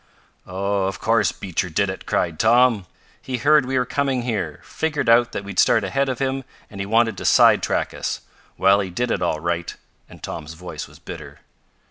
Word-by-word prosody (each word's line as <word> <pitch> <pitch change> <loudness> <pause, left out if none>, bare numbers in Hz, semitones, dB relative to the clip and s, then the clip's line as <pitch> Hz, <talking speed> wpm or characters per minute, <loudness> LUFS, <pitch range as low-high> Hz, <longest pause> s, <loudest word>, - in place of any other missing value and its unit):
"Oh, 100 +1 -1
of 95 - -3
course 115 -1 +2
Beecher 90 -1 -3
did 100 +5 +1
it!" 95 0 -6
cried 85 -2 -1
Tom. 115 -3 +4 0.3
"He 130 -1 -4
heard 145 +2 +4
we 130 0 0
were 125 - +2
coming 135 -1 -1
here, 105 -11 -3
figured 150 -5 -2
out 115 0 +5
that - - -4
we'd 100 -2 -4
start 115 -3 +4
ahead 135 +8 0
of 130 - -2
him, 135 0 -2 0.3
and 100 - -9
he 100 - -4
wanted 115 -1 +2
to - - -6
side - - +6
track - - -1
us. - - -4 0.4
Well, 95 +1 +4
he 95 -2 -2
did 120 +7 -2
it - - -1
all 85 -3 0
right," 85 +1 -3 0.3
and - - -15
Tom's 80 0 -6
voice 90 +2 -7
was - - -16
bitter. - - -10
105 Hz, 200 wpm, -22 LUFS, 95-125 Hz, 0.4 s, side